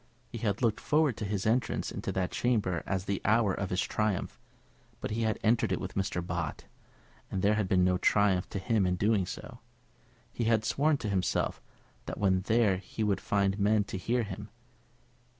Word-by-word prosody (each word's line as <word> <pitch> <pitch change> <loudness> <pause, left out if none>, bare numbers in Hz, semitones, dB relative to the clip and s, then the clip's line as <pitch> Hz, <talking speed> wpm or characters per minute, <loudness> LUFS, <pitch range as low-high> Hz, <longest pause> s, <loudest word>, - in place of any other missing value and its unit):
He 120 - -5
had 105 +1 -1
looked 115 -1 +2
forward 150 -3 +2
to 110 - -3
his 100 -1 -2
entrance 115 +3 0
into - - -4
that 95 -1 -1
Chamber 105 -8 0
as 95 -1 -1
the 100 -1 -2
hour 110 -2 +3
of 100 0 -3
his 90 - 0
triumph; 105 -4 -1 0.6
but - - -4
he 110 +2 -1
had 110 -1 +1
entered 115 -2 +2
it 95 - 0
with 95 - -5
Mr. 95 -3 -2
Bott, - - -3 0.7
and 95 - -3
there 105 +1 +4
had 105 -2 0
been 90 -1 +3
no 90 0 +2
triumph 100 -2 +2
to - - -4
him 100 0 +1
in 90 - +1
doing 100 -1 +1
so. - - -8 0.7
He 120 - -2
had 110 -1 +2
sworn 145 +5 +2
to 110 - -4
himself 95 -2 0 0.5
that - - -4
when 95 -2 +2
there 110 -4 +3
he 105 +3 -5
would 100 -2 +1
find 100 0 +1
men 105 +1 +3
to 100 - -6
hear 120 +5 0
him. 105 0 -7
105 Hz, 195 wpm, -30 LUFS, 95-110 Hz, 0.7 s, there